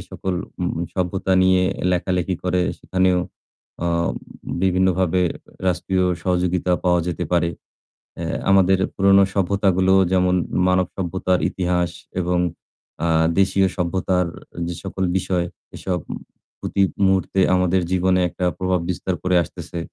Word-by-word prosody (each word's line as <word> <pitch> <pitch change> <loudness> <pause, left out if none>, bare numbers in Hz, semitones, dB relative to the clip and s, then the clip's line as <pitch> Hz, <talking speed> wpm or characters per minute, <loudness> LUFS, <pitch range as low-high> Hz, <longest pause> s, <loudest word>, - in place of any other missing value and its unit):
সকল 95 -1 -3 0.3
উ - - -1 0.3
সভ্যতা 95 +1 -1
নিয়ে 95 0 +4 0.3
লেখালেখি 90 +1 0
করে 90 0 +1 0.2
সেখানেও 95 -1 +1 0.7
আ - - +1 0.8
বিভিন্নভাবে 95 -1 +2 0.4
রাষ্ট্রীয় 90 +1 +1 0.2
সহযোগিতা 90 0 0
পাওয়া 90 -1 +3
যেতে 90 0 -2
পারে। 85 -1 +2 0.7
এ্যা - - -2
আমাদের 95 -1 +5 0.2
পুরোনো 100 0 +5
সভ্যতাগুলো 95 -1 +2 0.2
যেমন 90 -1 +3 0.3
মানব 90 -1 +3
সভ্যতার 95 0 0
ইতিহাস 90 -1 0 0.3
এবং 90 0 0 0.7
আ - - +2 0.3
দেশীয় 95 0 +3
সভ্যতার 90 0 0 0.4
যে 85 - -3
সকল 95 0 -3
বিষয় 90 -1 0 0.3
এসব 90 -2 -2 0.6
প্রতি 100 - -1 0.2
মুহূর্তে 95 0 +1
আমাদের 90 0 +2
জীবনে 95 0 +2
একটা 90 - -4
প্রভাব 95 -1 0
বিস্তার 90 +1 -2
করে 90 0 +2
আসতেছে। 85 - -8
90 Hz, 115 wpm, -21 LUFS, 90-95 Hz, 0.8 s, আমাদের